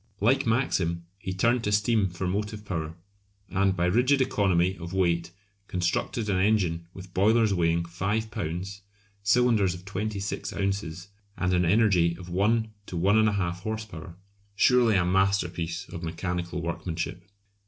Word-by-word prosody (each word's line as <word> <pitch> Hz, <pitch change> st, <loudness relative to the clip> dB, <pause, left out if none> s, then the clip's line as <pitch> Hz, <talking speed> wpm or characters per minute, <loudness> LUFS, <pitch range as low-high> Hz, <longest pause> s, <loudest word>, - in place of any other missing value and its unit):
Like 130 Hz, +5 st, +2 dB
Maxim, 85 Hz, -8 st, 0 dB
he 95 Hz, -, -5 dB
turned 115 Hz, +6 st, +1 dB
to 105 Hz, -, 0 dB
steam 105 Hz, -1 st, +2 dB
for 90 Hz, +2 st, -5 dB
motive 105 Hz, +3 st, -3 dB
power, 80 Hz, -4 st, -4 dB, 0.5 s
and 95 Hz, 0 st, +1 dB
by 90 Hz, -1 st, +1 dB
rigid 125 Hz, +9 st, +3 dB
economy 95 Hz, -7 st, +2 dB
of 85 Hz, +1 st, -7 dB
weight 85 Hz, -3 st, +1 dB, 0.4 s
constructed 90 Hz, +5 st, -1 dB
an 95 Hz, -3 st, +1 dB
engine 90 Hz, -5 st, +1 dB
with 95 Hz, 0 st, -11 dB
boilers 110 Hz, +2 st, +3 dB
weighing 85 Hz, -1 st, +1 dB
5 100 Hz, +6 st, -2 dB
lbs., 95 Hz, -1 st, -4 dB, 0.4 s
cylinders 105 Hz, -3 st, +3 dB
of 90 Hz, +1 st, -12 dB
26 100 Hz, 0 st, -3 dB
ozs., 95 Hz, -2 st, -3 dB, 0.3 s
and 90 Hz, 0 st, 0 dB
an 90 Hz, 0 st, +3 dB
energy 90 Hz, -4 st, +3 dB
of 90 Hz, -1 st, -10 dB
1 110 Hz, +5 st, +1 dB, 0.2 s
to 90 Hz, -, -5 dB
1 95 Hz, +5 st, +3 dB
1/2 100 Hz, -5 st, +1 dB
horse 110 Hz, +3 st, -4 dB
power! 85 Hz, -4 st, -10 dB, 0.4 s
Surely 120 Hz, -1 st, +4 dB
a 90 Hz, -2 st, +3 dB
masterpiece 90 Hz, -2 st, 0 dB
of 85 Hz, -, -7 dB
mechanical 85 Hz, +1 st, -3 dB
workmanship! 85 Hz, +1 st, -4 dB
95 Hz, 145 wpm, -27 LUFS, 85-105 Hz, 0.5 s, Surely